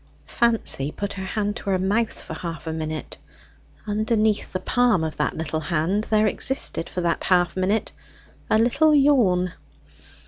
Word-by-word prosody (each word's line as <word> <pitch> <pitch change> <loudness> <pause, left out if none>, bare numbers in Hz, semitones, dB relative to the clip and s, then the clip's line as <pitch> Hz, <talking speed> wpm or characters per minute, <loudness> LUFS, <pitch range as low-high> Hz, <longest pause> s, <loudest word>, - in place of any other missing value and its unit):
Fancy 225 - +1
put 200 +4 -5
her 190 -1 -6
hand 205 +1 -2
to 200 - -6
her 190 - +2
mouth 205 +5 -1
for - - -7
half 170 -2 -6
a 160 - -3
minute. 155 -1 -5 0.7
Underneath 215 0 0
the 185 - -2
palm 240 -3 +2
of 160 -1 -3
that - - -1
little 160 0 -2
hand 170 +7 -1
there 215 0 +3
existed 215 -6 +1
for 180 - -3
that 170 -1 -1
half 175 -2 +2
minute 195 +3 0 0.6
a - - +4
little 275 +7 +3
yawn. 220 - +3
195 Hz, 160 wpm, -23 LUFS, 170-220 Hz, 0.7 s, a